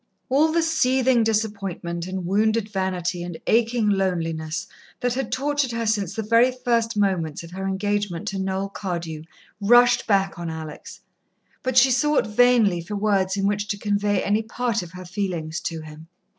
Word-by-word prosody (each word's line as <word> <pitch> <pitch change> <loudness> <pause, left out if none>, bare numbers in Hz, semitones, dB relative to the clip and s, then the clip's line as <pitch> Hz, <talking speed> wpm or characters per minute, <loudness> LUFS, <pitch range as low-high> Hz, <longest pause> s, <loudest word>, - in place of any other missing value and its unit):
All 295 +5 +3
the 335 +1 +2
seething 260 -6 +3
disappointment 200 -6 -2
and 185 -1 -4
wounded 215 +3 +1
vanity 185 -3 -2
and 175 -1 -6
aching 230 0 +2
loneliness 165 -5 -1 0.3
that 245 -1 0
had 250 -2 -3
tortured 285 +1 0
her 230 0 -2
since 205 -3 0
the 220 - -2
very 230 +4 +4
first 235 -3 0
moments 175 -7 0
of 170 - -11
her 190 +1 -4
engagement 205 -1 -2
to 195 - -4
Noel 190 +1 -2
Cardew, 170 -5 -5 0.4
rushed 240 +3 +5
back 195 -4 +1
on 170 -1 -4
Alex, 160 -1 -8 0.6
but 255 -1 -1
she 260 +1 +7
sought 295 +5 +2
vainly 215 -5 +3
for 190 +5 -6
words 200 -2 +1
in 195 - 0
which 205 +1 0
to 205 - -2
convey 205 0 0
any 210 +2 +1
part 230 0 -2
of 175 -1 -10
her 180 0 -9
feelings 175 -4 -3
to 165 -1 -4
him. 155 +1 -12
205 Hz, 170 wpm, -23 LUFS, 180-230 Hz, 0.6 s, she